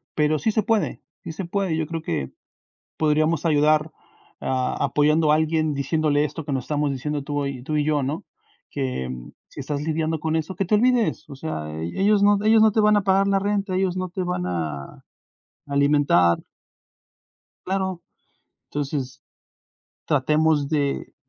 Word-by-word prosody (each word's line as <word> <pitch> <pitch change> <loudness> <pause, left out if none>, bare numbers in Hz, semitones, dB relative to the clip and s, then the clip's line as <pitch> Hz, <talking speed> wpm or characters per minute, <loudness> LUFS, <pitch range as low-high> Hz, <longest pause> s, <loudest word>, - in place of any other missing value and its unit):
pero 150 0 +2
sí 220 - +1
se 215 - +1
puede, 225 -2 0 0.2
sí - - -6
se 185 +3 -5
puede. 190 -1 -1
Yo 155 -2 -1
creo 165 -1 -4
que 70 - -3 0.7
podríamos 155 +1 +2
ayudar 155 0 +3 0.5
a 130 +1 -1
apoyando 150 +2 +3
a - - +5
alguien, 155 -1 +1
diciéndole 145 +1 +1
esto, 160 +1 -5
que 140 - -4
no 135 - 0
estamos 150 +2 -1
diciendo 145 +2 -3
tú 145 0 -2
y 135 -3 -5
tú 155 +2 -2
y 150 - +2
yo, 150 -1 +1
¿no? 145 +5 -3 0.5
Que, 65 0 -3 0.4
si - - -15
estás 145 +1 -3
lidiando 160 0 -1
con 160 +1 0
eso, 160 +3 -3
que 195 - 0
te 210 - +2
olvides. 245 0 +2
O 140 - -8
sea, 105 - -5
ellos 200 - +2
no 205 0 +5
ellos 220 0 +6
no 220 - +6
te 220 - -1
van 210 0 +4
a 205 - +2
pagar 195 +1 +3
la 195 0 +3
renta, 200 -1 -1
ellos 185 -1 0
no 185 0 -2
te 185 +1 -3
van 180 - -2
a 80 -6 -5 0.6
alimentar. 140 - +3 1.2
Claro. 190 -2 -2 0.6
Entonces, 140 -2 -4 0.9
tratemos 150 0 +2
de 145 -2 -1
155 Hz, 165 wpm, -23 LUFS, 140-185 Hz, 1.2 s, ellos